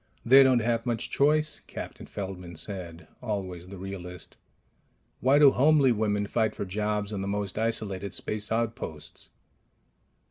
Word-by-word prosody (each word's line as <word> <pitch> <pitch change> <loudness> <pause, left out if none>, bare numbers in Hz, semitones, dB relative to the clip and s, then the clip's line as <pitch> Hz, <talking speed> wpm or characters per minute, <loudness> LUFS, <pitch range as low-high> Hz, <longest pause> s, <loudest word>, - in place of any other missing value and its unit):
"They 135 +3 +8
don't 130 -3 +5
have 115 +1 0
much 115 -2 -2
choice," 150 +2 +2
Captain - - -8
Feldman 90 -3 -6
said, 85 -1 -4
always 95 -6 -4
the 100 +1 -9
realist. 90 -2 -8 0.8
"Why 135 +3 +4
do 145 -2 +8
homely 140 0 +4
women 105 -2 0
fight 110 +1 0
for - - -3
jobs 105 +2 -2
on 100 - -3
the 95 - -3
most 100 -1 -2
isolated 100 -4 -2
space 105 0 -3
outposts?" 110 -10 -3
105 Hz, 140 wpm, -28 LUFS, 95-120 Hz, 0.8 s, They